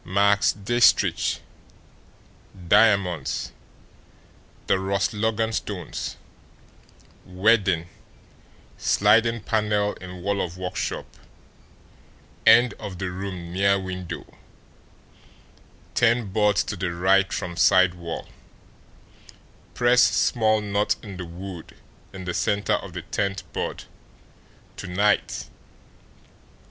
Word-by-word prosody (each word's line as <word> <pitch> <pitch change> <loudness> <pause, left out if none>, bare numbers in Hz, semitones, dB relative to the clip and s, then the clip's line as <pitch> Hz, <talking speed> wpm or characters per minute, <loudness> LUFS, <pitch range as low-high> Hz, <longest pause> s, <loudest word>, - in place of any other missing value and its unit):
"... - - -32
Max 100 +1 +3
Diestricht 120 +4 +2 1.3
diamonds 100 -8 +2 1.1
the 95 - +2
Ross 95 0 -1
Logan 110 +1 -1
stones 95 -6 -5 1.1
wedding 95 -3 +2 0.9
sliding 115 +3 +3
panel 105 -1 0
in 90 -1 -10
wall 100 0 0
of 90 0 -5
workshop 90 0 -4 1.4
end 120 +1 +7
of 95 -3 -7
the 95 0 -4
room 90 -2 -6
near 100 +1 +3
window 90 -2 -6 1.7
ten 115 -3 +2
boards 105 0 +2
to 110 - -5
the 90 -2 -3
right 95 +3 +2
from 90 -3 -4
side 95 +1 +4
wall 85 -2 -7 1.5
press 125 0 +4
small 110 -2 +3
knot 105 0 0
in 100 -4 -8
the 90 - -6
wood 85 0 -9 0.4
in 95 -1 -9
the 90 - -3
centre 100 +2 0
of - - -3
the - - -6
tenth 100 0 -2
board - - -4 0.9
to 100 - -7
night 100 +3 0
100 Hz, 100 wpm, -24 LUFS, 90-105 Hz, 1.7 s, end